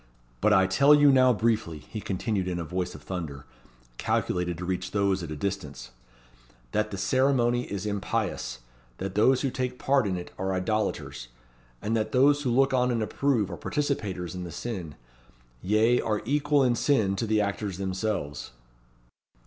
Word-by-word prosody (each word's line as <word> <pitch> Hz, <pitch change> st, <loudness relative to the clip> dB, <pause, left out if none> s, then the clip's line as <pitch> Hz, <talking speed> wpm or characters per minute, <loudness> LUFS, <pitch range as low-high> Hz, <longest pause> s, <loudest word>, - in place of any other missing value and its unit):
But 105 Hz, -, +4 dB
I 95 Hz, -2 st, +5 dB
tell 140 Hz, +10 st, +5 dB
you 145 Hz, -1 st, +6 dB
now 130 Hz, -1 st, +5 dB
briefly," 110 Hz, -7 st, 0 dB
he 105 Hz, +8 st, -8 dB
continued 95 Hz, 0 st, -2 dB
in 90 Hz, -1 st, -2 dB
a 85 Hz, -, -3 dB
voice 90 Hz, +2 st, -3 dB
of -, -, -12 dB
thunder, 75 Hz, -7 st, -6 dB, 0.5 s
calculated 90 Hz, -1 st, -1 dB
to 90 Hz, -, -5 dB
reach 95 Hz, 0 st, -2 dB
those 100 Hz, -1 st, +1 dB
at 85 Hz, -, -6 dB
a 75 Hz, -, -4 dB
distance, 75 Hz, -8 st, -5 dB, 0.8 s
"that 105 Hz, 0 st, 0 dB
the 100 Hz, -, -5 dB
ceremony 125 Hz, +1 st, +2 dB
is 100 Hz, 0 st, -3 dB
impious; 95 Hz, -11 st, -2 dB, 0.4 s
that 95 Hz, 0 st, -4 dB
those 125 Hz, +6 st, +4 dB
who 135 Hz, -, 0 dB
take 125 Hz, 0 st, -3 dB
part 135 Hz, -4 st, +2 dB
in 95 Hz, -2 st, -1 dB
it 90 Hz, -, -7 dB
are 95 Hz, 0 st, -1 dB
idolaters; 95 Hz, -, -2 dB, 0.6 s
and 110 Hz, +2 st, 0 dB
that 110 Hz, -1 st, -1 dB
those 145 Hz, +3 st, +4 dB
who 135 Hz, -, -1 dB
look 135 Hz, +3 st, +3 dB
on 125 Hz, -1 st, +3 dB
and 115 Hz, -3 st, 0 dB
approve 115 Hz, -4 st, 0 dB
are 85 Hz, -, -5 dB
participators 105 Hz, -, -2 dB
in 90 Hz, -1 st, -5 dB
the 85 Hz, -, -7 dB
sin; 90 Hz, -5 st, -5 dB, 0.7 s
yea, 110 Hz, +5 st, +3 dB
are 105 Hz, -1 st, -1 dB
equal 145 Hz, +2 st, +2 dB
in 125 Hz, -2 st, +3 dB
sin 110 Hz, -7 st, +2 dB
to 115 Hz, -, -1 dB
the 110 Hz, 0 st, +2 dB
actors 100 Hz, -2 st, -2 dB
themselves." 95 Hz, -, -3 dB
105 Hz, 175 wpm, -27 LUFS, 90-125 Hz, 0.8 s, you